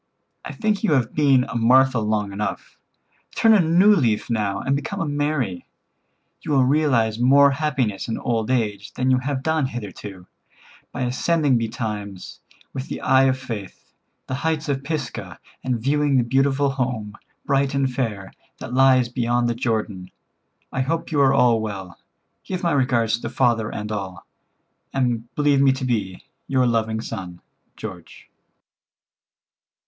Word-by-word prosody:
I - - -6
think 215 -2 -1
you 180 - +3
have 125 -5 +1
been 140 -4 +4
a - - -7
Martha 125 +2 +4
long 105 -2 -1
enough; 105 +2 -4 0.6
turn 225 -1 +5
a 215 - +5
new 180 +5 +5
leaf 120 - 0
now 105 -3 0
and 135 +6 0
become 195 +8 -4
a 165 - -1
Mary. 145 - -2 0.7
You 150 - -3
will 135 -2 +4
realize 130 -6 +2
more 140 +3 +6
happiness 135 -9 -1
in 115 - -2
old 115 -2 -1
age 105 -5 -1
than 130 +1 +1
you 130 - +3
have 135 0 -3
done 160 -3 +1
hitherto, 105 -5 -8 0.7
by - - -5
ascending 135 +1 +1
betimes, 105 -4 -5 0.3
with 130 0 -5
the - - -5
eye 130 +1 +4
of 130 -1 +2
faith, 115 -7 -8 0.3
the - - -5
heights 160 -1 -1
of 135 -1 -2
Pisgah, 145 -5 -5 0.2
and 125 -2 -1
viewing 145 +3 +1
the 125 - +3
beautiful 135 +3 +1
home, 120 -6 -3 0.3
bright 140 0 +1
and 135 -2 0
fair, 105 -7 -3 0.2
that 120 - -8
lies 130 -1 +4
beyond 120 0 0
the 120 - 0
Jordan. 110 -6 -3 0.6
I 135 - -1
hope 165 +6 -2
you 145 -3 +2
are 135 -1 +5
all 125 -4 +3
well. 95 -5 -6 0.4
Give 185 0 -5
my 170 - +2
regards 120 -5 +1
to - - -5
father 120 -4 +1
and 105 0 -5
all, 95 -4 -5 0.7
and 120 -3 -1
believe 145 -2 +3
me 135 -1 +5
to 130 0 -4
be, 105 -7 -2 0.2
"Your 130 -2 +2
loving 110 -2 0
son, 90 -5 -7 0.4
"George." - - -10
125 Hz, 155 wpm, -22 LUFS, 110-140 Hz, 0.7 s, more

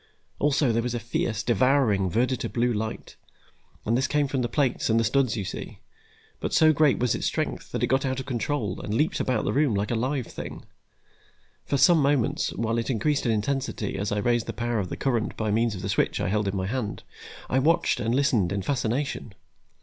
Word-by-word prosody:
Also, 145 -3 +2
there 115 +1 +1
was 120 0 -2
a - - -1
fierce, 110 -1 -2
devouring 120 -4 +2
verditer 125 +6 0
blue 120 0 +1
light, 110 +1 -5 0.7
and 115 - +1
this 130 +2 +1
came 150 -1 +1
from 135 -1 -1
the 120 - -1
plates 135 -6 0
and 115 +1 +3
studs 125 0 +1
you 100 - -3
see, - - -6 0.6
but - - -3
so 155 0 +6
great 150 -2 +3
was 125 -2 +1
its - - -1
strength - - -3
that - - -2
it - - +6
got 135 +1 +1
out 130 -1 -1
of 130 - -5
control 120 -5 -2
and 105 - -3
leaped 150 +6 +1
about 125 -4 0
the - - 0
room 140 -5 +2
like 100 +3 -1
a - - +1
live 130 +2 -1
thing. - - -8 1.0
For 140 - 0
some 170 +3 +5
moments, 140 -4 +1
while 115 0 -1
it 115 - -3
increased 140 +3 0
in - - +3
intensity 110 -1 -2
as 100 +2 -2
I 105 - 0
raised 120 +2 +1
the - - -3
power 120 -1 -1
of 95 -3 -3
the - - -5
current 120 -5 -1
by 110 -1 -1
means 115 0 +1
of 95 - -7
the - - -3
switch - - +1
I - - -1
held 105 0 0
in 95 - -2
my 95 - -1
hand, 110 0 -3 0.4
I 130 - +1
watched 160 -1 +2
and 115 0 0
listened 125 -10 +2
in 100 -1 -2
fascination. 125 -2 -2
120 Hz, 220 wpm, -26 LUFS, 110-135 Hz, 1.0 s, so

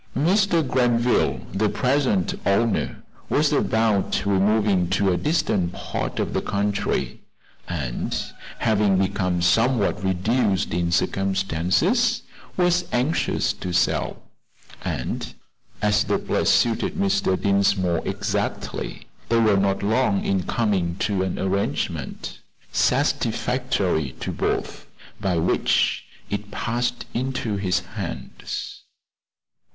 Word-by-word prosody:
Mr. 170 0 +3
Granville, 120 -1 +2
the 105 +2 +1
present 125 - +1
owner, 115 +4 +1 0.3
was - - +2
about 110 -3 +1
removing 100 -2 +2
to 95 +1 +2
a - - 0
distant 100 - 0
part - - -4
of - - -1
the - - 0
country, 100 0 -1 0.5
and 70 -8 -3 0.4
having 105 -3 +2
become 90 -2 0
somewhat 110 +2 +2
reduced 95 +2 +1
in 85 -1 0
circumstances, 95 - +1 0.3
was 180 -1 +2
anxious 130 +7 +1
to 90 - -6
sell, 90 0 +1 0.7
and - - -4 0.5
as 105 0 +3
the - - +1
place - - 0
suited - - +2
Mr. 100 -1 +1
Dinsmore 100 -3 +2
exactly, - - -3 0.2
they 115 - +3
were 110 -3 +4
not 100 0 +1
long 110 -1 +1
in 95 -1 +1
coming 95 -4 0
to 100 -2 0
an 95 -1 -2
arrangement, 100 +1 -2 0.3
satisfactory 75 -5 0
to - - -3
both, - - -2 0.3
by 95 -4 0
which 80 - +1 0.2
it 100 0 -4
passed 120 +2 -2
into 125 -4 -2
his 95 -2 0
hands. - - -6
100 Hz, 105 wpm, -23 LUFS, 95-120 Hz, 0.7 s, were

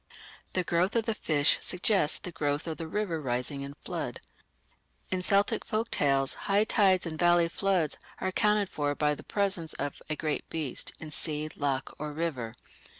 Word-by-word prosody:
The 185 - +1
growth 175 +4 +1
of 230 -2 +2
the 225 - +1
fish 150 -7 +3
suggests 180 -3 +2
the 180 - -7
growth 145 -2 -1
of 160 -2 -4
the 165 - -5
river 175 -3 -2
rising 125 +1 -2
in 140 +1 -7
flood. - - -4 0.9
In 185 -1 0
Celtic 200 +2 +2
folk 225 0 -2
tales 135 -2 +3 0.2
high 200 +1 +5
tides 190 -4 +4
and 160 -2 -5
valley 175 -1 +5
floods 180 -3 0 0.2
are 190 - 0
accounted 210 +1 +2
for 145 -4 -1
by 150 0 +2
the - - -8
presence 195 -5 0
of 145 0 -4
a 155 - 0
"great 155 -1 -2
beast" 155 -5 -1
in 155 -2 -7
sea, 155 0 -1
loch, 135 -2 -1
or 150 0 -4
river. 140 -8 -3
165 Hz, 175 wpm, -29 LUFS, 145-190 Hz, 0.9 s, high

